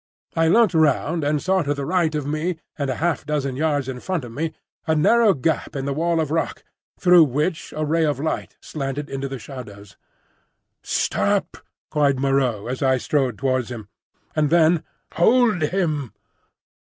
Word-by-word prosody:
I 165 0 +3
looked 220 +3 +4
round 160 +1 +2
and 145 +1 +1
saw 190 +4 +1
to 145 -2 -1
the 140 -1 -4
right 165 -1 +1
of 150 -2 -2
me 155 +5 -1 0.2
and 140 -2 -2
a 130 - -1
half 170 +4 -1
dozen 145 -3 -2
yards 145 -2 0
in 130 -2 -5
front 175 -2 -3
of 120 - -9
me 160 +6 -3 0.4
a 160 - +2
narrow 215 +6 +4
gap 150 +2 -1
in 135 -1 -3
the 140 - -1
wall 165 +3 0
of 155 -2 -1
rock 165 0 -2 0.4
through 175 -3 +7
which 150 +5 -2
a 155 - 0
ray 165 +2 +1
of 145 -3 0
light 155 +2 -3
slanted 140 0 -5
into 135 0 -3
the 135 0 -5
shadows. 105 -5 -10 0.8
"Stop!" - - 0 0.4
cried 140 -3 +2
Moreau 135 -6 +1
as 125 +3 -4
I 130 -1 +3
strode 125 0 0
towards 130 -1 0
this, 120 -3 -6 0.5
and 150 -2 +2
then, 165 0 +4 0.3
"Hold 220 +1 +3
him!" 155 - -1
150 Hz, 175 wpm, -22 LUFS, 135-165 Hz, 0.8 s, through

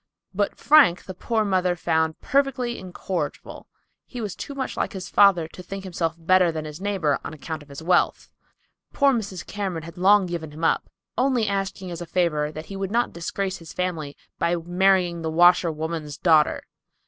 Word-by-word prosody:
But 200 +1 0
Frank 285 - +5
the 190 - -7
poor 220 +4 -1
mother 185 -2 +1
found 160 -2 0
perfectly 260 -3 0
incorrigible. 185 0 -5 0.4
He 250 - -8
was 210 -5 -4
too 280 - -7
much 265 -1 -3
like - - -2
his 190 -2 -6
father 190 -5 +5
to 180 - -11
think 195 +2 -7
himself 170 -3 -2
better 180 +1 +3
than 155 -1 -5
his 155 +3 -8
neighbor 190 -8 0
on - - -6
account 155 +1 -6
of 145 - -16
his 140 +3 -9
wealth. 180 +2 +1 0.6
Poor 280 -1 +4
Mrs. 195 -8 -4
Cameron 190 -5 -4
had 170 +2 -10
long 200 +1 +5
given 170 -3 -5
him 155 +2 -10
up, 165 - +1 0.3
only 250 -4 +2
asking 195 -2 -3
as 170 0 -6
a 175 - -6
favor 155 -4 0
that 155 +1 -8
he 195 - -8
would 195 -1 -3
not 240 +3 0
disgrace 190 +3 -3
his 165 -2 -12
family 165 -6 -3 0.2
by 170 +1 +1
marrying 175 0 +2
the 160 - -2
washerwoman's 160 -3 +2
daughter. 155 -4 +3
180 Hz, 185 wpm, -24 LUFS, 160-195 Hz, 0.6 s, Frank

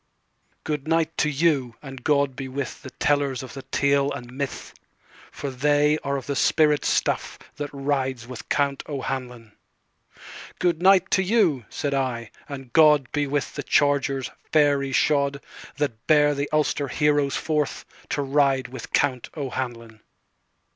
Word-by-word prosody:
"Good 150 -2 -3
night 165 0 +1
to 150 - +2
you, 140 -5 +1
and 135 -3 -9
God 140 -3 +2
be 135 0 -5
withThe 130 0 -5
tellers 140 -3 +1
of 130 - -9
the 135 - -7
tale 140 +1 +1
and 120 0 -7
myth, 140 +1 -5 0.6
For 140 -1 -5
they 145 +3 +2
are 140 0 -1
of 130 - -7
the 140 - -2
spirit 150 +1 +3
stuffThat 145 -1 -2
rides 135 -3 -2
with 125 -2 -9
Count 140 -1 +1
O'Hanlon.""Good 130 +6 -6
night 190 0 +5
to 190 - +4
you," 185 - +2
said 145 -1 -3
I, 125 -4 -2 0.2
"and 135 -4 -8
GodBe 150 -2 +4
with 145 0 -1
the - - -4
chargers, 140 -2 +1 0.2
fairy 145 -3 +3
shod, 140 0 +2 0.4
That 125 -6 -3
bear 150 -1 +5
the 140 0 -3
Ulster 150 -2 +1
heroes 145 -1 +1
forthTo 150 -1 -3
ride 135 -2 +2
with 130 - -9
Count 130 -4 +1
O'Hanlon." 120 -5 -5
140 Hz, 135 wpm, -24 LUFS, 130-150 Hz, 0.6 s, night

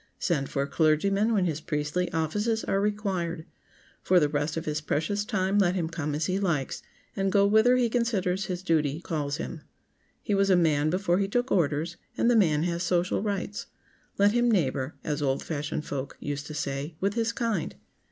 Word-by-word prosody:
Send 145 -7 -1
for 140 - -1
a - - -4
clergyman 195 +9 +2
when 200 -5 +2
his 160 -3 -2
priestly 150 +5 -2
offices 210 +8 0
are 195 - 0
required. 190 -6 -2 0.6
For 185 -1 +4
the 150 -3 +2
rest 145 +1 -1
of 165 - -3
his 150 0 -2
precious 165 +7 -1
time 205 -2 0
let 185 -2 +3
him 170 -3 -1
come 155 -3 -3
as 155 +1 -1
he 190 +1 0
likes, 165 -9 -1 0.3
and 195 0 0
go 200 0 +4
whither 220 +5 +5
he 245 -1 +3
considers 205 -6 0
his 180 0 -4
duty 155 -4 +1
calls 150 -4 -3
him. 160 - -6 0.6
He 210 - -1
was 195 0 +3
a 185 - +6
man 155 -3 +3
before 180 +1 +1
he 200 - +1
took 245 +5 -1
orders, 160 -1 +1 0.2
and 240 - +3
the - - +4
man 160 -8 +3
has 170 0 -1
social 175 +1 +1
rights. 205 -1 -3 0.5
Let 200 +1 +5
him 240 +1 +2
"neighbor," 140 - 0
as 150 -1 -2
old 135 -1 0
fashioned 150 -1 -3
folk 140 -1 -5
used 145 0 -4
to 155 - -7
say, 140 +2 -3
with 195 +2 0
his 230 0 0
kind. 230 -8 -2
175 Hz, 195 wpm, -27 LUFS, 150-200 Hz, 0.6 s, a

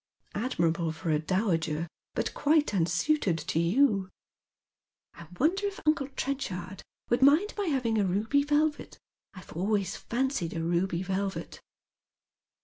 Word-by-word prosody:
" - - -35
Admirable 170 -7 0
for 160 +1 -3
a 150 - +2
dowager, 165 -3 0 0.3
but - - -1
quite 300 -3 +2
unsuited 180 - +1
to 165 - -2
you." 195 +2 +3 0.6
" - - -65
1 170 - -11
wonder 385 +8 +2
if 400 - -6
uncle 305 -3 +2
Trenchard 195 -9 -3 0.3
would 240 +2 +2
mind 305 +10 +5
my 410 -2 -2
having 245 -7 +1
a - - +3
ruby 215 +10 +2
velvet? 295 +1 0 0.4
I 185 - -9
have - - -13
always 200 +3 0
fancied 250 - -2
a 165 - -2
ruby 175 +1 0
velvet." 195 +1 -3
200 Hz, 140 wpm, -29 LUFS, 170-280 Hz, 0.6 s, mind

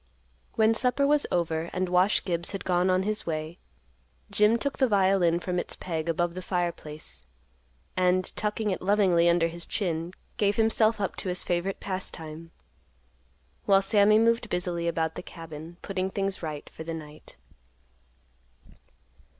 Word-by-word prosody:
When 220 -1 +4
supper 250 +4 +2
was 295 +1 +2
over, 165 -1 0
and 185 0 0
Wash 180 +3 +3
Gibbs 170 +1 -1
had 195 - -4
gone 180 0 +2
on 185 0 +2
his 215 0 -2
way; 155 +2 -4 0.7
Jim 210 +2 +4
took 280 +3 -3
the 260 - +4
violin 190 -5 +3
from 180 0 -2
its - - -4
peg 165 -2 -4
above 170 +1 0
the 185 - -6
fireplace, 170 - -4 0.7
and, 185 0 +2
tucking 210 0 -1
it 185 - -3
lovingly 185 -4 +4
under 170 -1 +3
his 170 +1 -7
chin, 170 -4 -2 0.3
gave 205 -1 +2
himself 220 -1 +3
up 195 - -2
to 190 - -3
his 180 - -1
favorite 180 +2 -1
pastime, 165 -4 -5 1.2
while 195 0 +5
Sammy 205 +1 +5
moved 230 0 +2
busily 175 -1 -1
about 160 -1 0
the - - -6
cabin, 165 -1 -10
putting 190 -1 -2
things 195 0 -2
right 155 -3 -5
for 160 - -8
the 165 0 -4
night. 155 -1 -11
180 Hz, 150 wpm, -27 LUFS, 170-205 Hz, 1.2 s, while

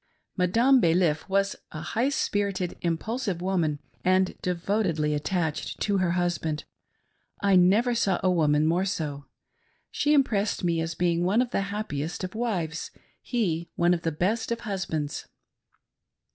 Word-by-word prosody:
Madame 230 +9 +4
Balif 165 -2 +2
was 195 0 +1 0.2
a 155 - -6
high 230 - 0
spirited, 200 -9 -1
impulsive 195 +3 -2
woman, 175 -5 0 0.3
and 185 +1 +2
devotedly 175 -4 0
attached 160 +1 -2
to 205 -2 +1
her 175 -2 +1
husband; 170 -4 -1 0.8
I 200 -1 +4
never 205 +7 +4
saw 195 -6 +1
a 185 - +4
woman 150 -3 +3
more 170 +4 +2
so. 150 -7 -3 0.7
She 295 +1 +2
impressed 215 -9 +1
me 170 -2 +1
as 165 0 -3
being 175 0 +1
one 195 +6 +2
of 245 -1 +1
the - - +1
happiest 175 -6 -4
of 185 - -4
wives; 190 -9 -2 0.3
he 170 -9 -1
one 175 +1 +3
of 170 - -1
the 165 - -1
best 200 +10 -1
of 235 - -2
husbands. 170 -8 -3
180 Hz, 145 wpm, -27 LUFS, 165-205 Hz, 0.8 s, Madame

